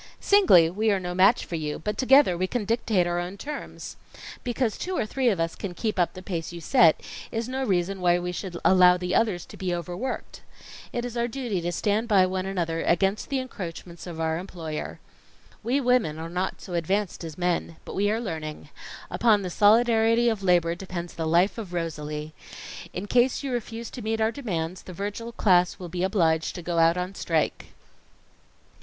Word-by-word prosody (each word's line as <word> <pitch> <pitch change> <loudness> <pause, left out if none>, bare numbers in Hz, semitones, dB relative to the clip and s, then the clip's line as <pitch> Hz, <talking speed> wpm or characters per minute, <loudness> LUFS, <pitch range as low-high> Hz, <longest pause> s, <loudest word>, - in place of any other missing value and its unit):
Singly, 370 - +6
we 215 +4 0
are 200 -2 +2
no 180 -1 -4
match 185 +2 +4
for - - -10
you, 150 -2 -2
but 210 +6 -3
together, 265 -7 +5
we 185 +2 -1
can 230 +1 -2
dictate 220 -4 +1
our 175 0 -1
own 180 +3 -5
terms. 290 +8 -7 0.5
Because 240 -2 -1
two 370 0 -3
or - - 0
three 255 +3 +1
of 195 -6 0
us 165 0 -1
can 185 -3 -6
keep 215 -2 -2
up 175 - +2
the 185 - -9
pace 170 -4 -4
you 170 - -7
set, 165 - +4 0.3
is 225 +1 -2
no 260 +1 -2
reason 190 -3 0
why 175 -1 +4
we 175 0 -3
should 180 -1 -5
allow 180 -1 +6
the 180 0 -3
others 205 -7 +1
to - - -12
be 185 -2 -2
overworked. 175 +9 -5 0.5
It 240 0 -3
is 245 -1 -6
our 235 0 0
duty 235 -6 -3
to 175 +1 -2
stand 210 +5 0
by 195 -4 +5
one 185 0 -2
another 170 -4 -2
against 195 +4 +1
the 275 - 0
encroachments 180 -9 -7
of 165 -2 -7
our 160 0 0
employer. 165 -4 -6 0.6
We 245 +5 +1
women 250 - +2
are 165 +1 -6
not 180 +2 -2
so 180 - -8
advanced 185 +3 -1
as 160 -2 -7
men. 175 -2 -1
But - - -7
we 205 +1 +1
are 220 +2 0
learning. 155 -8 -6 0.4
Upon 205 +2 +3
the 180 - -4
solidarity 230 +3 +4
of 220 -3 -2
labor 175 -3 +3
depends 175 -1 -6
the 160 -1 -3
life 175 +7 +3
of 195 -5 -7
Rosalie. 150 -2 -4 0.6
In 185 - -5
case 245 +5 +2
you 275 - -3
refuse 235 -1 -4
to 250 - -7
meet 220 +1 -1
our 220 +1 +2
demands, 185 -9 -4
the 185 - -10
Virgil 205 +5 -5
class 180 -6 +3
will 180 -3 -8
be 175 +1 -4
obliged 165 -4 +1
to 175 - -7
go 170 0 -1
out 165 +1 +4
on 180 +2 -3
strike." 165 -5 -1
185 Hz, 200 wpm, -26 LUFS, 170-225 Hz, 0.6 s, Singly